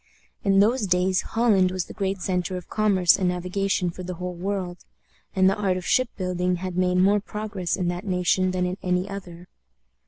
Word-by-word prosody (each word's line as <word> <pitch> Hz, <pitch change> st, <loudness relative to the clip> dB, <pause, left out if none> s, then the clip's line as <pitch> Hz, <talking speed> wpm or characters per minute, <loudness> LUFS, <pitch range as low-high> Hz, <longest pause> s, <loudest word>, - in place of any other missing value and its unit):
In 195 Hz, -1 st, +4 dB
those 220 Hz, +1 st, +2 dB
days 185 Hz, +1 st, +2 dB
Holland 215 Hz, -5 st, +2 dB
was 185 Hz, -1 st, -3 dB
the -, -, -10 dB
great 195 Hz, -1 st, -2 dB
centre 180 Hz, -1 st, -1 dB
of 180 Hz, -, -9 dB
commerce 200 Hz, -4 st, +3 dB
and 185 Hz, -2 st, +2 dB
navigation 180 Hz, 0 st, -1 dB
for 185 Hz, -, -9 dB
the 180 Hz, 0 st, -5 dB
whole 180 Hz, +1 st, -5 dB
world, 180 Hz, 0 st, -3 dB, 0.6 s
and 190 Hz, -1 st, +4 dB
the 195 Hz, -, +3 dB
art 195 Hz, -3 st, 0 dB
of 180 Hz, -, -6 dB
ship 255 Hz, -2 st, +2 dB
building 180 Hz, -1 st, 0 dB
had 180 Hz, 0 st, -5 dB
made 180 Hz, 0 st, +2 dB
more 200 Hz, +3 st, +4 dB
progress 205 Hz, -3 st, -3 dB
in 180 Hz, -2 st, -1 dB
that 175 Hz, +4 st, -4 dB
nation 185 Hz, 0 st, +2 dB
than 185 Hz, 0 st, 0 dB
in 180 Hz, +1 st, -3 dB
any 180 Hz, +1 st, 0 dB
other. 180 Hz, -3 st, -8 dB
185 Hz, 195 wpm, -24 LUFS, 180-195 Hz, 0.6 s, In